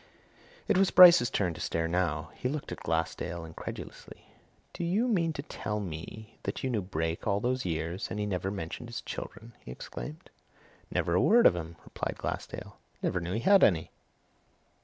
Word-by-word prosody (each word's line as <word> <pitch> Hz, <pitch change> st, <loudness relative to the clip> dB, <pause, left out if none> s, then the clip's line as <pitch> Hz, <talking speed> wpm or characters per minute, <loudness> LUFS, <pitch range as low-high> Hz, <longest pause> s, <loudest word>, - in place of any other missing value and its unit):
It 185 Hz, -, +3 dB
was 195 Hz, -, +4 dB
Bryce's 175 Hz, -8 st, +9 dB
turn 90 Hz, -4 st, 0 dB
to -, -, -9 dB
stare 80 Hz, 0 st, -1 dB
now. 80 Hz, -2 st, -1 dB
He 125 Hz, -, -3 dB
looked 145 Hz, +1 st, -4 dB
at -, -, -5 dB
Glassdale 80 Hz, +1 st, -2 dB
incredulously. 80 Hz, -, -9 dB, 0.4 s
"Do -, -, -4 dB
you 200 Hz, +8 st, +1 dB
mean 175 Hz, -8 st, +2 dB
to 140 Hz, -, -5 dB
tell 105 Hz, -7 st, -4 dB
me 100 Hz, +4 st, -7 dB
that -, -, -4 dB
you 130 Hz, -, 0 dB
knew 110 Hz, -4 st, 0 dB
Brake 80 Hz, -2 st, -3 dB
all 100 Hz, -1 st, +2 dB
those 125 Hz, +3 st, -1 dB
years 85 Hz, +2 st, -2 dB
and -, -, -4 dB
that -, -, -1 dB
he -, -, 0 dB
never 95 Hz, -1 st, -2 dB
mentioned 95 Hz, +4 st, -5 dB
his 120 Hz, -, -5 dB
children?" 115 Hz, +1 st, -7 dB
he -, -, -13 dB
exclaimed. 60 Hz, +3 st, -8 dB, 0.6 s
"Never 85 Hz, -, 0 dB
a 90 Hz, -, +4 dB
word 235 Hz, +3 st, +5 dB
of 90 Hz, -, +7 dB
'em!" 85 Hz, -1 st, -6 dB
replied -, -, -4 dB
Glassdale. -, -, -5 dB, 0.2 s
"Never 90 Hz, -, +1 dB
knew 85 Hz, +2 st, -4 dB
he 115 Hz, -, -1 dB
had 195 Hz, +4 st, +6 dB
any!" 80 Hz, -5 st, +3 dB
95 Hz, 185 wpm, -30 LUFS, 80-130 Hz, 0.6 s, Bryce's